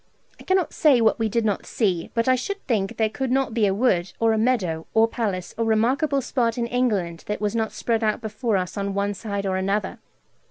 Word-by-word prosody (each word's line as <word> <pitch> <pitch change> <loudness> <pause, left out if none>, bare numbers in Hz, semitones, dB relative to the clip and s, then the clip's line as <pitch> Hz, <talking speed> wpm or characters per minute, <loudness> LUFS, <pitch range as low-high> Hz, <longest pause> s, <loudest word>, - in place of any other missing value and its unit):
I - - -12
cannot 375 -3 +1
say 285 -6 +4
what 225 0 +3
we 225 -1 +1
did 230 +1 0
not 205 -3 -1
see, 185 -7 0
but 230 +1 +1
I 255 - +5
should 395 +11 -2
think 205 -6 -1
there 220 - +2
could 260 +4 -3
not 265 -3 +1
be 220 -3 +2
a - - +2
wood, 190 -6 +1
or 225 -1 +3
a - - +1
meadow, 190 -10 0
or 225 0 +5
palace, 200 -6 -3
or 230 - +1
remarkable 260 +6 +2
spot 235 -2 0
in 235 - 0
England 210 -9 -1
that 210 - -2
was 210 +1 -1
not 220 -1 0
spread 230 -1 -1
out 215 -1 +1
before 220 -1 -1
us 180 +2 -4
on 200 0 -2
one 200 0 0
side 200 -1 -4
or 190 -1 0
other. 200 +2 -1
220 Hz, 230 wpm, -23 LUFS, 200-240 Hz, -, I